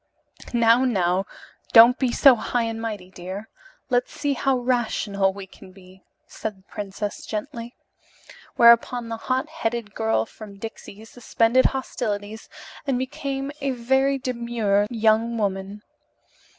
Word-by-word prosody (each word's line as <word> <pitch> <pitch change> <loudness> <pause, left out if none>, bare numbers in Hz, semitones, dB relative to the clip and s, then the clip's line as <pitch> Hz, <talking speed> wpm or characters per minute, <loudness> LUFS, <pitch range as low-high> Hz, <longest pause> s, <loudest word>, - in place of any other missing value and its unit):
"Now, 235 +1 +4
now, 190 -5 +1 0.5
don't 235 +2 +8
be 255 -3 +1
so 270 +1 +6
high 235 +1 -1
and 225 0 -4
mighty, 205 -5 -5
dear. 190 +4 -8 0.4
Let 245 0 +3
us - - -27
see 290 -1 -2
how 270 0 +1
rational 220 -5 0
we 195 0 -9
can 190 0 -16
be," 185 0 -17 0.2
said 215 -3 -6
the 190 - -24
Princess 205 +1 -6
gently. 230 +2 -6 0.8
Whereupon 235 0 +5
the 225 - -4
hot 255 +3 -1
headed 225 -2 -3
girl 110 0 0
from 205 - -12
Dixie 220 0 -9
suspended 235 +1 +1
hostilities 220 -5 -3 0.4
and 265 -2 +1
became 270 +1 -4
a 275 - -1
very 265 +2 +1
demure 235 -5 0
young 225 0 +2
woman. 200 0 -3
225 Hz, 135 wpm, -23 LUFS, 205-250 Hz, 0.8 s, don't